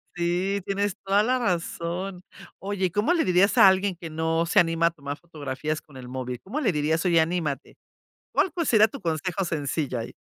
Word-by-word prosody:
Sí, 180 Hz, +3 st, 0 dB
tienes 200 Hz, 0 st, -1 dB
toda 195 Hz, +1 st, +3 dB
la 255 Hz, +3 st, +2 dB
razón. 180 Hz, -2 st, -2 dB, 0.4 s
Oye, 190 Hz, -2 st, -2 dB
¿cómo 210 Hz, -, +2 dB
le 335 Hz, -, +2 dB
dirías 185 Hz, +2 st, +3 dB
a -, -, +9 dB
alguien 190 Hz, 0 st, +3 dB
que 165 Hz, -1 st, -8 dB
no 160 Hz, +1 st, 0 dB
se -, -, +4 dB
anima 165 Hz, 0 st, +3 dB
a -, -, 0 dB
tomar 145 Hz, -3 st, -6 dB
fotografías 155 Hz, -2 st, -4 dB
con 145 Hz, -, -20 dB
el 130 Hz, -1 st, -9 dB
móvil? 125 Hz, -1 st, -5 dB
¿Cómo 225 Hz, +11 st, -4 dB
le 250 Hz, -10 st, +2 dB
dirías?: 155 Hz, +1 st, 0 dB
"Oye 170 Hz, -2 st, +4 dB
anímate". 160 Hz, -4 st, -2 dB, 0.5 s
¿Cuál 380 Hz, -, +2 dB
pues 335 Hz, 0 st, -2 dB
sería 215 Hz, -2 st, +6 dB
tu -, -, -9 dB
consejo 175 Hz, +2 st, -2 dB
sencillo 145 Hz, -5 st, -2 dB
ahí? 115 Hz, -, -6 dB
175 Hz, 195 wpm, -25 LUFS, 155-195 Hz, 0.5 s, a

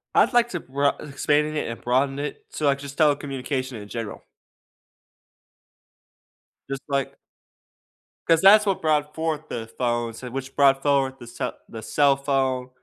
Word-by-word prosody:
I'd -, -, +4 dB
like 240 Hz, 0 st, +4 dB
to 175 Hz, -, -3 dB
broa 140 Hz, +1 st, 0 dB
e -, -, -9 dB
expand 150 Hz, +2 st, +1 dB
it -, -, -2 dB
and 115 Hz, -, -7 dB
broaden 135 Hz, +3 st, +1 dB
it 145 Hz, -, -5 dB
to, 155 Hz, -, -2 dB
like, 140 Hz, -1 st, +3 dB
just 140 Hz, 0 st, -9 dB
telecommunication 135 Hz, -5 st, 0 dB
in 105 Hz, -, -10 dB
general. 115 Hz, -1 st, -6 dB, 2.5 s
Just 135 Hz, -1 st, -4 dB
like 140 Hz, -1 st, -1 dB, 1.1 s
'Cause 165 Hz, -1 st, +4 dB
that's 210 Hz, +2 st, +7 dB
what 195 Hz, -2 st, 0 dB
brought 150 Hz, -1 st, +1 dB
forth 160 Hz, -2 st, -3 dB
the 115 Hz, -1 st, -5 dB
phones 120 Hz, -1 st, -2 dB
and 125 Hz, -, -7 dB
which 135 Hz, 0 st, -5 dB
brought 135 Hz, -1 st, +4 dB
forward 135 Hz, -2 st, +2 dB
the 120 Hz, -, -11 dB
cell 120 Hz, -, -5 dB
the 110 Hz, -1 st, -8 dB
cell 140 Hz, +4 st, +3 dB
phone 135 Hz, -2 st, -1 dB
140 Hz, 160 wpm, -24 LUFS, 130-150 Hz, 2.5 s, that's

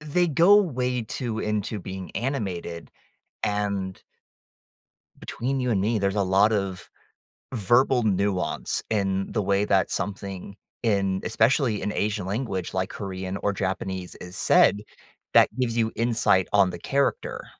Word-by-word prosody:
they 150 Hz, +4 st, +1 dB
go 170 Hz, +7 st, +6 dB
way 125 Hz, -, +1 dB
too 115 Hz, 0 st, -4 dB
into 105 Hz, 0 st, -2 dB
being 95 Hz, 0 st, -7 dB
animated, 95 Hz, -10 st, -4 dB, 0.5 s
and 100 Hz, -2 st, -2 dB, 1.1 s
between 135 Hz, +3 st, -3 dB
you 125 Hz, -1 st, 0 dB
and 95 Hz, -3 st, +1 dB
me, 110 Hz, +1 st, +1 dB
there's 100 Hz, +1 st, 0 dB
a 100 Hz, -, +2 dB
lot 100 Hz, +4 st, +4 dB
of 95 Hz, -3 st, -3 dB, 0.6 s
verbal 120 Hz, +3 st, +3 dB
nuance 100 Hz, -2 st, 0 dB
in 95 Hz, -2 st, 0 dB
the 110 Hz, -, 0 dB
way 100 Hz, +1 st, +1 dB
that 95 Hz, -2 st, +2 dB
something, 100 Hz, -1 st, -4 dB, 0.3 s
in 100 Hz, -4 st, +1 dB
especially 115 Hz, 0 st, +2 dB
in 105 Hz, -, -2 dB
Asian 105 Hz, -2 st, -1 dB
language 100 Hz, -2 st, -3 dB
like 95 Hz, 0 st, -1 dB
Korean 95 Hz, -1 st, -5 dB
or 100 Hz, -, -1 dB
Japanese 95 Hz, -1 st, -3 dB
is 90 Hz, 0 st, -10 dB
said, 105 Hz, -, +4 dB, 0.5 s
that -, -, +7 dB
gives 120 Hz, -2 st, 0 dB
you 110 Hz, -1 st, +1 dB
insight 115 Hz, -5 st, +2 dB
on 100 Hz, -2 st, +5 dB
the 85 Hz, -, -7 dB
character. 140 Hz, +7 st, -1 dB
105 Hz, 140 wpm, -25 LUFS, 95-115 Hz, 1.1 s, that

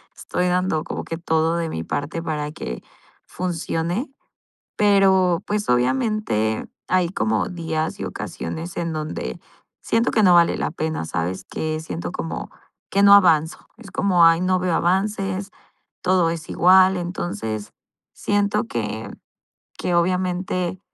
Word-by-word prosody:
Estoy 180 Hz, -, -2 dB
dando 180 Hz, -3 st, +1 dB
como -, -, -5 dB
que 165 Hz, -, -4 dB
todo 160 Hz, 0 st, +1 dB
de 165 Hz, -1 st, -1 dB
mi 80 Hz, -, -4 dB
parte 145 Hz, -, -3 dB
para 150 Hz, -2 st, -3 dB
que 60 Hz, -, -6 dB, 0.4 s
funcione. 175 Hz, -, -2 dB, 0.7 s
Pero, 190 Hz, -4 st, +4 dB
pues, 210 Hz, 0 st, -1 dB
obviamente, 125 Hz, -, +1 dB, 0.2 s
hay 185 Hz, -1 st, +2 dB
como 110 Hz, -, 0 dB
días 160 Hz, -2 st, -3 dB
y -, -, -2 dB
ocasiones 165 Hz, -, -6 dB
en 170 Hz, -1 st, -2 dB
donde 155 Hz, -, -4 dB, 0.4 s
siento 230 Hz, +2 st, +1 dB
que 215 Hz, -, +2 dB
no 180 Hz, -3 st, +6 dB
vale 170 Hz, -1 st, +4 dB
la -, -, -1 dB
pena, 160 Hz, -, -3 dB
¿sabes? 90 Hz, +3 st, -3 dB
Que 155 Hz, 0 st, -3 dB
siento 85 Hz, -, -5 dB
como 80 Hz, 0 st, -5 dB, 0.4 s
que 200 Hz, -, +2 dB
no 200 Hz, 0 st, +9 dB
avanzo. 165 Hz, -5 st, +4 dB
Es 220 Hz, -4 st, -12 dB
como: 180 Hz, -4 st, +4 dB
"Ay, 165 Hz, +1 st, +4 dB
no 185 Hz, 0 st, +2 dB
veo 180 Hz, -2 st, 0 dB
avances, 195 Hz, +1 st, 0 dB, 0.5 s
todo 180 Hz, -2 st, +3 dB
es 165 Hz, -2 st, -5 dB
igual". 185 Hz, +1 st, +5 dB
Entonces, 140 Hz, -, -4 dB, 0.4 s
siento 205 Hz, -, 0 dB
que, 110 Hz, -2 st, -4 dB, 0.7 s
que 180 Hz, -, -2 dB
obviamente 180 Hz, 0 st, 0 dB
170 Hz, 140 wpm, -22 LUFS, 155-185 Hz, 0.7 s, no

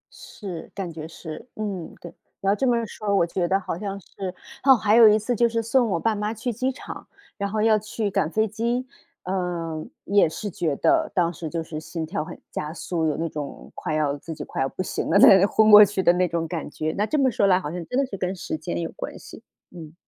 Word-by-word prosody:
是， 180 Hz, -6 st, -8 dB
感 190 Hz, -4 st, -4 dB
觉 155 Hz, 0 st, -7 dB
是， 160 Hz, -1 st, -9 dB
嗯， 200 Hz, -6 st, -4 dB
对， 175 Hz, -, -10 dB, 0.3 s
要 195 Hz, +1 st, +3 dB
这 260 Hz, +5 st, 0 dB
么 235 Hz, -1 st, +2 dB
说 210 Hz, -1 st, -2 dB
我 170 Hz, -, +4 dB
觉 175 Hz, +1 st, -1 dB
得 195 Hz, +2 st, +2 dB
好 185 Hz, -, -4 dB
像 200 Hz, -1 st, -4 dB
是 -, -, -21 dB, 0.6 s
嚯， 270 Hz, -1 st, +8 dB
还 215 Hz, 0 st, +3 dB
有 230 Hz, -2 st, +9 dB
一 210 Hz, -, +5 dB
次 230 Hz, +3 st, -1 dB
就 235 Hz, +1 st, +3 dB
是 230 Hz, 0 st, -1 dB
送 235 Hz, 0 st, +2 dB
我 170 Hz, -3 st, 0 dB
爸 225 Hz, +4 st, +1 dB
妈 210 Hz, +1 st, -2 dB
去 230 Hz, +2 st, -3 dB
机 255 Hz, +4 st, -1 dB
场， -, -, -9 dB, 0.3 s
然 200 Hz, -1 st, -3 dB
后 215 Hz, +1 st, 0 dB
要 220 Hz, -1 st, +4 dB
去 215 Hz, -1 st, -3 dB
赶 190 Hz, -5 st, +1 dB
飞 220 Hz, +5 st, +1 dB
机， 235 Hz, +4 st, -1 dB, 0.4 s
嗯， 175 Hz, -4 st, -3 dB
也 200 Hz, -4 st, +3 dB
是 205 Hz, +5 st, -5 dB
觉 160 Hz, -4 st, -1 dB
得 320 Hz, -, +2 dB
当 175 Hz, -1 st, +2 dB
时 160 Hz, 0 st, -6 dB
就 165 Hz, 0 st, -3 dB
是 155 Hz, -1 st, -6 dB
心 160 Hz, +1 st, -5 dB
跳 165 Hz, -1 st, -3 dB
很 -, -, -10 dB
加 150 Hz, +1 st, -4 dB
速， 165 Hz, -1 st, -2 dB
有 150 Hz, -, -1 dB
那 165 Hz, +1 st, -1 dB
种 150 Hz, -2 st, -7 dB
快 155 Hz, -, -3 dB
要 145 Hz, -2 st, +1 dB
自 160 Hz, +3 st, -8 dB
己 150 Hz, -, -6 dB
快 -, -, -4 dB
要 135 Hz, -, +1 dB
不 185 Hz, -, -4 dB
行 -, -, -3 dB
了， 190 Hz, -, +4 dB
在 200 Hz, -, +9 dB
那 190 Hz, +1 st, +5 dB
昏 220 Hz, +1 st, +4 dB
过 210 Hz, 0 st, +12 dB
去 195 Hz, -1 st, 0 dB
的 175 Hz, -, +6 dB
那 180 Hz, 0 st, +2 dB
种 165 Hz, 0 st, -2 dB
感 165 Hz, -1 st, -4 dB
觉。 155 Hz, +1 st, -3 dB
那 210 Hz, +2 st, 0 dB
这 305 Hz, -, 0 dB
么 265 Hz, -3 st, +3 dB
说 200 Hz, -, +2 dB
来 185 Hz, -1 st, +4 dB
好 150 Hz, -4 st, -5 dB
像 175 Hz, -1 st, -5 dB
真 250 Hz, -, -2 dB
的 275 Hz, -, +2 dB
是 205 Hz, -, -7 dB
跟 185 Hz, 0 st, -2 dB
时 175 Hz, -, -4 dB
间 120 Hz, -, -4 dB
有 -, -, -4 dB
关 -, -, -7 dB
系， -, -, -12 dB, 0.3 s
嗯。 160 Hz, -2 st, -11 dB
190 Hz, 270 characters per minute, -24 LUFS, 165-215 Hz, 0.6 s, 过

